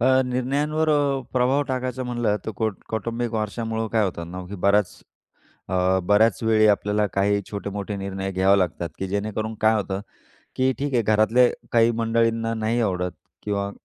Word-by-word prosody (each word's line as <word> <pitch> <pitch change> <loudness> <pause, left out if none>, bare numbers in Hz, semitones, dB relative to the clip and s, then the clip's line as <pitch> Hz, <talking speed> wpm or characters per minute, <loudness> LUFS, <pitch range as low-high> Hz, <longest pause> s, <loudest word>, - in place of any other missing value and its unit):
अ, 120 - +2 0.2
निर्णयांवर 145 +5 0
अ, 145 -2 +2
प्रभाव 130 +3 +2
टाकायचा 130 0 -2
म्हणलं 120 -4 0
तर - - -1
कौ 110 - +1 0.2
कौटुंबिक 115 +2 -3
वारशामुळं 110 +1 -2
काय 110 -1 +2
होतं 85 -3 -4
ना 90 +1 -6
की 100 - -7
बऱ्याच 100 -1 +2 0.7
अ, 95 0 +2
बऱ्याचवेळी 110 +1 +4
आपल्याला 105 0 +2
काही 100 +1 +2
छोटे-मोठे 100 0 -4
निर्णय 95 0 -4
घ्यावे 95 +2 +4
लागतात 85 -2 -1
की 95 - -2
जेणेकरून 110 +2 -2
काय 110 +1 +4
होतं, 100 -2 -2 0.6
की 130 0 +2
ठीक 140 -1 -2
आहे 120 - +3
घरातले 110 +4 +4 0.2
काही 115 0 +5
मंडळींना 115 0 +1
नाही 110 +2 0
आवडत 90 -5 0 0.3
किंवा 100 -1 -2
110 Hz, 155 wpm, -23 LUFS, 100-120 Hz, 0.7 s, काही